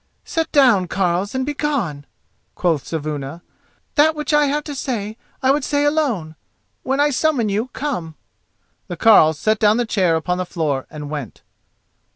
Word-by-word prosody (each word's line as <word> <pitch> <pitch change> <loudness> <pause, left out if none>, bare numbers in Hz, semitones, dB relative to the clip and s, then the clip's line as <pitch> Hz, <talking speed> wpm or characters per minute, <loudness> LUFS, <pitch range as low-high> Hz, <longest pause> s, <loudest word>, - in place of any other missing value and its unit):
"Set 325 -1 -2
down, 240 - +4
carles, 185 +4 -1
and 260 0 0
begone!" 270 - -2 0.5
quoth 165 -6 0
Saevuna; 155 0 -5 0.5
"that 310 +1 +4
which 300 0 -3
I 295 0 +5
have 295 +2 -1
to 295 - -6
say 220 -6 -3 0.3
I 260 - +5
would 285 0 +1
say 285 +2 0
alone. 250 - 0 0.5
When 270 +2 -1
I 290 0 +3
summon 265 -5 +1
you, 210 +5 -1
come." 245 - -4 0.7
The 175 - -6
carles 160 -7 +6
set 215 +6 +1
down 215 +1 +4
the 245 - +1
chair 185 -7 +1
upon 180 +3 -1
the - - 0
floor 150 -7 -2
and 150 -1 -8
went. 145 -7 -6
215 Hz, 165 wpm, -20 LUFS, -, 0.7 s, carles